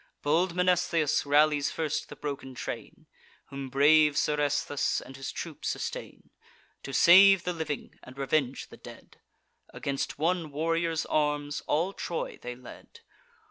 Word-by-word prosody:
Bold 170 +4 +1
Mnestheus 175 -5 +1
rallies 145 0 +3
first 155 -1 -3
the - - -9
broken 135 -3 -6
train, - - -7 0.4
Whom 135 -1 -6
brave 150 +2 +4
Seresthus 145 -1 0
and 135 - -12
his 135 0 -6
troop - - -7
sustain. - - -5 0.5
To 140 - -7
save 190 +6 +7
the 180 - -2
living, 155 -4 -5
and 130 +1 -14
revenge 135 -1 -1
the - - -13
dead, - - -14 0.5
Against 140 0 -4
one 165 +1 0
warrior's 165 +2 -1
arms 150 -1 -1
all 170 +6 0
Troy 170 - -5
they 125 0 -6
led. 125 0 -14
150 Hz, 135 wpm, -28 LUFS, 140-165 Hz, 0.5 s, save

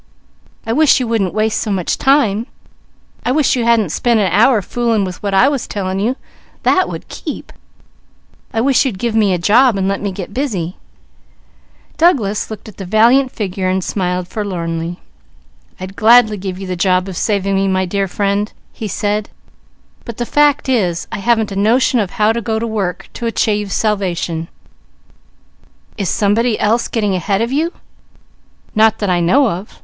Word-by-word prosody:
I 225 - -1
wish 305 +1 +4
you 250 - -2
wouldn't 215 -6 0
waste 215 +1 0
so 220 - -3
much 190 -4 -1
time! 245 -5 +2 0.8
I 245 - 0
wish 290 0 +2
you 240 -2 -1
hadn't 225 -7 +2
spent 235 +4 +1
an 190 -4 +1
hour 215 +3 +4
fooling 230 0 0
with 185 -1 -7
what 200 -1 -1
I 220 +8 +5
was 280 -4 -1
telling 190 -2 -3
you; 235 +6 0 0.5
that 370 - +3
would - - -7
keep. - - -7 1.0
I 225 - 0
wish 270 +1 +3
you'd 250 -9 -2
give 235 +2 -2
me 215 -3 +3
a 180 - +1
job, 220 +6 +4
and 190 0 0
let 195 0 -1
me 200 -1 -2
get 190 +1 -7
busy." 200 - -2 1.2
Douglas 235 - +2
Bruce 210 -2 0
smiled 180 -2 -2
forlornly. 175 -4 -4 0.8
"I'd 185 +1 -7
gladly 225 0 +5
give 185 -1 -5
you 195 - -7
the 185 -1 -3
job 185 +1 +1
of 190 - -6
saving 200 0 0
me, 195 0 +1
my 185 0 +1
dear 195 +2 -1
friend," 200 +2 -1 0.2
he 220 - -5
said, 205 +1 -2 0.7
"but 235 - -8
the 240 - -2
fact 295 +2 +2
is 185 -10 0
I - - -4
haven't 220 0 +1
a - - -5
notion 235 +5 +2
of 200 -4 -1
how 215 +1 +3
to 235 - -2
go 220 0 -2
to 225 - -2
work 205 -5 -3
to 235 - -4
achieve 210 -2 0
salvation." 180 -6 -1 1.5
"Is 195 -5 -2
somebody 215 +3 +1
else 230 +3 +1
getting 210 -4 -1
ahead 195 +4 0
of 235 - -3
you?" 320 +5 0 1.0
"Not 220 0 +4
that 205 -4 -1
I 175 - +2
know 245 +11 +3
of! 195 0 -6
210 Hz, 170 wpm, -16 LUFS, 190-235 Hz, 1.5 s, I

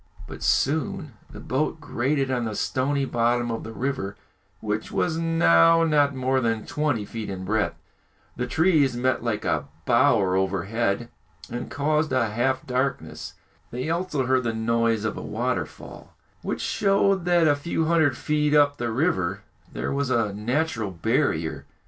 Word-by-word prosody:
But - - -10
soon 160 - 0 0.2
the - - -11
boat 155 +4 -1
grated 135 -1 -1
on 125 -2 0
the 110 -2 -3
stony 140 +4 0
bottom 120 -1 +1
of 115 - -4
the 115 - -7
river, 115 -5 -3 0.4
which 105 0 -3
was 160 - 0
now 165 - +5
not 145 -3 +3
more 130 0 +1
than 115 -2 -1
twenty 145 -8 -1
feet 115 0 -6
in 95 -1 -5
breadth. 105 +2 0 0.6
The 125 0 -3
trees 150 -3 +3
met 130 -1 0
like 115 -3 -2
a - - 0 0.2
bower 120 -7 +3
overhead, 100 +4 -1 0.4
and 120 - -5
caused 150 +2 0
a 120 -4 +1
half 130 +4 0
darkness. 130 +2 -3 0.4
They 125 +6 -3
also 165 -6 -1
heard 130 0 +2
the 115 -1 -1
noise 115 -1 +1
of 110 - -2
a - - -5
waterfall, - - -4 0.3
which - - -3
showed 195 -2 +2
that 175 -2 +4
a 145 - +4
few 160 +2 -2
hundred 160 -5 +2
feet 150 -1 +1
up 145 -1 +4
the 120 -1 -2
river 100 - 0 0.3
there - - -3
was 140 -1 -1
a 115 -5 +1
natural 115 +1 -1
barrier. 80 -4 -1
130 Hz, 155 wpm, -25 LUFS, 110-150 Hz, 0.6 s, now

